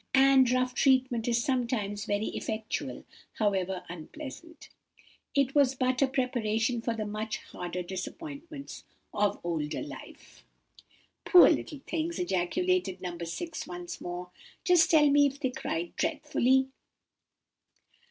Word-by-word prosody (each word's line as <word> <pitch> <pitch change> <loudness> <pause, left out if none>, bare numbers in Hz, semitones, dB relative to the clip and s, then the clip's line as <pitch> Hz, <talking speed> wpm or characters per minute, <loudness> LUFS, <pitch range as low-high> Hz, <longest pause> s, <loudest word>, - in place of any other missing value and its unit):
And 265 -1 +6
rough 255 0 +1
treatment 255 -4 +2
is 235 0 +2
sometimes 235 -6 -1
very 205 +1 0
effectual, 220 0 -4 0.3
however 190 -3 0
unpleasant. 300 - -9 0.7
It 275 -1 +2
was 275 -2 +4
but 255 0 0
a 275 - +5
preparation 240 -3 0
for 230 0 -1
the 215 -1 -3
much 215 +1 -3
harder 180 0 -6
disappointments 285 - -7 0.3
of 205 0 +1
older 160 -3 -2
life." - - -11 0.8
"Poor 360 - +8
little 295 -4 -3
things!" 335 +1 -2
ejaculated 190 - 0
No. 180 -1 -5
6, 175 - -5
once 175 -1 -7
more. 180 0 -6 0.3
"Just 355 -1 +5
tell 310 -4 +6
me 285 0 +5
if 275 0 -6
they 260 -4 -1
cried 170 -8 -4
dreadfully." 265 -4 +2
250 Hz, 125 wpm, -29 LUFS, 195-280 Hz, 0.8 s, Poor